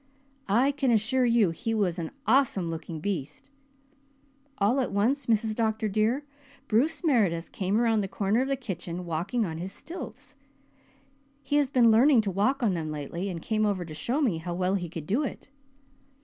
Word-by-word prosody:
I 245 Hz, +8 st, +4 dB
can 275 Hz, -2 st, 0 dB
assure 235 Hz, +3 st, +2 dB
you 230 Hz, -6 st, +3 dB
he 225 Hz, +6 st, -3 dB
was 185 Hz, -5 st, 0 dB
an 160 Hz, -2 st, -3 dB, 0.2 s
awesome 220 Hz, -8 st, +2 dB
looking 160 Hz, -1 st, -6 dB
beast. 155 Hz, -, -4 dB, 1.1 s
All 215 Hz, +7 st, +2 dB
at 260 Hz, -, -1 dB
once, 240 Hz, +7 st, +1 dB
Mrs. 220 Hz, -1 st, +2 dB
Dr. 220 Hz, 0 st, 0 dB
dear, 220 Hz, +7 st, 0 dB, 0.4 s
Bruce 275 Hz, +12 st, +1 dB
Meredith 200 Hz, -, +1 dB
came 195 Hz, +3 st, 0 dB
around 225 Hz, -2 st, +2 dB
the 195 Hz, -, -2 dB
corner 200 Hz, +4 st, 0 dB
of 265 Hz, -, -1 dB
the 275 Hz, -, +1 dB
kitchen 180 Hz, -7 st, -6 dB
walking 175 Hz, +8 st, -1 dB
on 160 Hz, -3 st, -5 dB
his 185 Hz, +3 st, -5 dB
stilts. 340 Hz, -, -9 dB, 1.1 s
He 290 Hz, +2 st, +1 dB
has 285 Hz, -3 st, +2 dB
been 240 Hz, -4 st, +5 dB
learning 245 Hz, +2 st, +6 dB
to 205 Hz, -2 st, -2 dB
walk 250 Hz, +8 st, +1 dB
on 210 Hz, -5 st, +3 dB
them 160 Hz, -3 st, -3 dB
lately 160 Hz, +6 st, -4 dB
and 170 Hz, -3 st, -6 dB
came 215 Hz, -1 st, 0 dB
over 200 Hz, -4 st, 0 dB
to 160 Hz, -, -9 dB
show 240 Hz, -, -1 dB
me 195 Hz, -12 st, +1 dB
how 175 Hz, +1 st, -5 dB
well 185 Hz, +1 st, 0 dB
he 180 Hz, -4 st, -2 dB
could 160 Hz, -2 st, -7 dB
do 220 Hz, -, +1 dB
it. 280 Hz, -, -6 dB
215 Hz, 185 wpm, -27 LUFS, 180-245 Hz, 1.1 s, learning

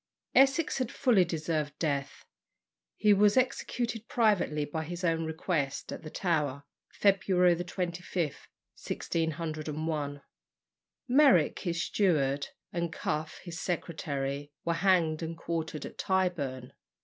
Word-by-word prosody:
Essex 270 Hz, +3 st, +4 dB
had 255 Hz, -2 st, -1 dB
fully 240 Hz, -9 st, +4 dB
deserved 155 Hz, -3 st, -2 dB
death. 140 Hz, -4 st, -2 dB, 0.7 s
He 210 Hz, -1 st, +5 dB
was 205 Hz, +3 st, +4 dB
executed 240 Hz, -3 st, 0 dB
privately, 205 Hz, -, +2 dB
by 160 Hz, +2 st, -3 dB
his 175 Hz, +3 st, -6 dB
own 165 Hz, -1 st, +1 dB
request, 160 Hz, -3 st, -2 dB
at -, -, -6 dB
the 155 Hz, -, -8 dB
Tower, 150 Hz, -6 st, -1 dB, 0.3 s
February 185 Hz, -3 st, +3 dB
25, 175 Hz, +1 st, -4 dB
1601. 155 Hz, -1 st, -4 dB, 0.9 s
Meyrick, 260 Hz, -, +5 dB
his 170 Hz, -2 st, -2 dB
steward, 145 Hz, -8 st, +1 dB, 0.3 s
and 170 Hz, -1 st, -1 dB
Cuffe, 155 Hz, -1 st, -3 dB
his 170 Hz, -3 st, -6 dB
secretary, 145 Hz, -5 st, -3 dB
were 170 Hz, -, +2 dB
hanged 170 Hz, -3 st, +2 dB
and 165 Hz, 0 st, -4 dB
quartered 160 Hz, -2 st, -3 dB
at -, -, -10 dB
Tyburn. 160 Hz, -10 st, -1 dB
165 Hz, 115 wpm, -30 LUFS, 150-190 Hz, 0.9 s, He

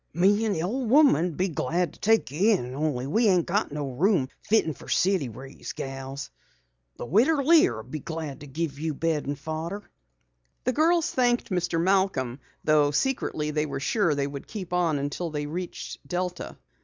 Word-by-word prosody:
"Me 205 Hz, +5 st, +3 dB
and 210 Hz, -, 0 dB
the 160 Hz, -, -2 dB
ole 240 Hz, +7 st, -2 dB
woman'd 195 Hz, -, +4 dB
be 185 Hz, -, +1 dB
glad 170 Hz, +2 st, -1 dB
to -, -, -18 dB
take 225 Hz, -8 st, +2 dB
you 195 Hz, +10 st, +3 dB
in, 125 Hz, -3 st, -6 dB
only 140 Hz, -3 st, -1 dB
we 220 Hz, -, +2 dB
ain't 180 Hz, -4 st, +3 dB
got 200 Hz, 0 st, 0 dB
no 145 Hz, -2 st, -3 dB
room 165 Hz, -, +2 dB
fitten 210 Hz, -7 st, +2 dB
for -, -, -13 dB
city 185 Hz, -8 st, +2 dB
raised 130 Hz, +5 st, -9 dB
gals. 135 Hz, +1 st, -6 dB, 0.7 s
The -, -, -5 dB
Widder 265 Hz, -, +3 dB
Lear'll 265 Hz, -, +4 dB
be 155 Hz, +6 st, -6 dB
glad 155 Hz, -3 st, -5 dB
to 145 Hz, -, -10 dB
give 145 Hz, 0 st, -4 dB
you 155 Hz, -1 st, -2 dB
bed 160 Hz, -1 st, -1 dB
and 145 Hz, 0 st, -2 dB
fodder." 160 Hz, +7 st, -5 dB, 0.8 s
The 255 Hz, -, +1 dB
girls 330 Hz, +3 st, +3 dB
thanked 245 Hz, -3 st, +1 dB
Mr. 175 Hz, -2 st, 0 dB
Malcom, 180 Hz, -9 st, +1 dB, 0.2 s
though 150 Hz, -1 st, +4 dB
secretly 150 Hz, -, -1 dB
they 150 Hz, 0 st, 0 dB
were 135 Hz, -1 st, -4 dB
sure 170 Hz, -, +1 dB
they 140 Hz, -1 st, 0 dB
would 140 Hz, -1 st, -7 dB
keep 185 Hz, -5 st, -6 dB
on 170 Hz, -4 st, +2 dB
until 145 Hz, +5 st, -3 dB
they 150 Hz, -1 st, -3 dB
reached 175 Hz, +4 st, -6 dB
Delta. 180 Hz, 0 st, -3 dB
165 Hz, 180 wpm, -26 LUFS, 145-200 Hz, 0.8 s, woman'd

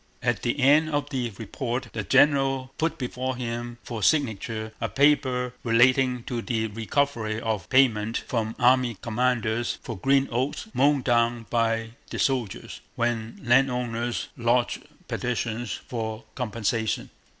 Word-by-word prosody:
At 120 Hz, -4 st, +1 dB
the 120 Hz, +4 st, -1 dB
end 150 Hz, +4 st, +5 dB
of 145 Hz, -1 st, -2 dB
the 125 Hz, -3 st, -1 dB
report 120 Hz, +3 st, -4 dB
the 110 Hz, -, -3 dB
general 135 Hz, +1 st, +3 dB
put 165 Hz, +1 st, 0 dB
before 130 Hz, 0 st, -3 dB
him 120 Hz, -1 st, -4 dB
for 115 Hz, -3 st, -5 dB
signature 110 Hz, -5 st, 0 dB
a 115 Hz, -, -1 dB
paper 130 Hz, -1 st, +2 dB
relating 125 Hz, +1 st, +3 dB
to 120 Hz, -1 st, -3 dB
the 115 Hz, -3 st, -1 dB
recovery 115 Hz, 0 st, -1 dB
of 110 Hz, -3 st, -3 dB
payment 115 Hz, -5 st, +3 dB
from 110 Hz, -2 st, -2 dB
army 125 Hz, -2 st, +3 dB
commanders 120 Hz, 0 st, 0 dB
for 115 Hz, -, -5 dB
green 135 Hz, +7 st, +2 dB
oats 130 Hz, +4 st, -1 dB
mown 140 Hz, 0 st, +3 dB
down 120 Hz, -1 st, +2 dB
by 115 Hz, -1 st, +1 dB, 0.2 s
the -, -, -5 dB
soldiers, 125 Hz, -8 st, -2 dB
when 115 Hz, -1 st, -2 dB
landowners 120 Hz, -2 st, +1 dB
lodged 120 Hz, +1 st, +1 dB, 0.3 s
petitions 120 Hz, -2 st, -2 dB
for 110 Hz, -1 st, -5 dB
compensation. 115 Hz, -2 st, -2 dB
120 Hz, 130 wpm, -26 LUFS, 115-130 Hz, 0.3 s, end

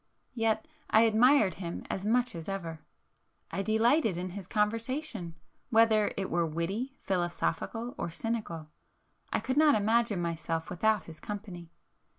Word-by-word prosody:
Yet 225 Hz, +5 st, 0 dB, 0.2 s
I 220 Hz, -, +6 dB
admired 225 Hz, -, +5 dB
him 170 Hz, -1 st, -4 dB
as 195 Hz, +2 st, -3 dB
much 245 Hz, +2 st, +2 dB
as 165 Hz, 0 st, -6 dB
ever,—I 170 Hz, +1 st, -8 dB
delighted 220 Hz, -, +3 dB
in 180 Hz, +1 st, -4 dB
his 190 Hz, -1 st, -7 dB
conversation, 225 Hz, -, -1 dB, 0.3 s
whether 220 Hz, -2 st, +4 dB
it 195 Hz, -1 st, -2 dB
were 170 Hz, 0 st, +2 dB
witty, 190 Hz, -, -3 dB
philosophical 195 Hz, +6 st, -1 dB
or -, -, -2 dB
cynical,—I 165 Hz, -6 st, -6 dB
could 260 Hz, +1 st, -2 dB
not 305 Hz, -1 st, +6 dB
imagine 220 Hz, -1 st, +2 dB
myself 165 Hz, -1 st, -2 dB
without 215 Hz, +3 st, +2 dB
his 160 Hz, -1 st, -12 dB
company. 195 Hz, -5 st, -7 dB
210 Hz, 130 wpm, -30 LUFS, 175-230 Hz, 0.3 s, I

